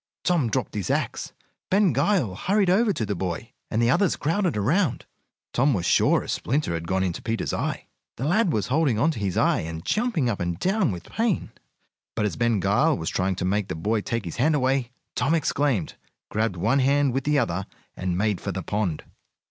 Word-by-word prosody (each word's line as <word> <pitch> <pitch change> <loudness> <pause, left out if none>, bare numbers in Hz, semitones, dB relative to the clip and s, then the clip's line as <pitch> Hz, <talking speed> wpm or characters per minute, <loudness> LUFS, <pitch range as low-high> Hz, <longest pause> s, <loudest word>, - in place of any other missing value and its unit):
Tom 165 -10 +2
dropped 130 +3 -2
his 100 -4 -3
axe. - - -1 0.4
Ben 195 -4 +3
Gile 140 - +1
hurried 190 - +1
over 215 +3 +3
to 115 - -2
the 105 - -2
boy, 95 +5 -4 0.2
and 110 - -1
the 120 0 +3
others 195 +4 +2
crowded 170 - 0
around. 140 - +1 0.5
Tom 135 +1 +3
was 90 -3 -2
sure - - +3
a - - -10
splinter 140 - -1
had 85 0 -4
gone 95 +1 +1
into 90 -3 -2
Peter's 115 0 -2
eye. - - -2 0.3
The 130 - -4
lad 190 +3 +2
was 105 -3 -1
holding 140 -4 +2
on 150 +9 +3
to 140 - -6
his 95 -3 -2
eye, - - +3
and 80 0 -6
jumping 215 - +1
up 110 -4 -1
and 85 -1 -2
down 190 - +1
with 90 -2 -6
pain. 225 -4 -1 0.6
But 105 - 0
as 105 - -1
Ben 120 -3 +1
Gile 120 - +2
was 80 - -3
trying 95 0 0
to 90 - -3
make 100 +1 0
the - - -4
boy 105 +7 0
take 115 0 -3
his 85 - -6
hand 150 +6 +3
away, 130 -2 +1 0.2
Tom 155 +4 +1
exclaimed, 140 - 0 0.4
grabbed 110 -2 0
one 115 +10 +2
hand 140 0 +3
with 135 +1 -1
the 150 +1 +2
other, 95 -6 -1 0.3
and 90 -1 -2
made 105 -1 0
for 100 - -3
the 95 0 -4
pond. 100 -4 -2
120 Hz, 210 wpm, -25 LUFS, 95-155 Hz, 0.6 s, Ben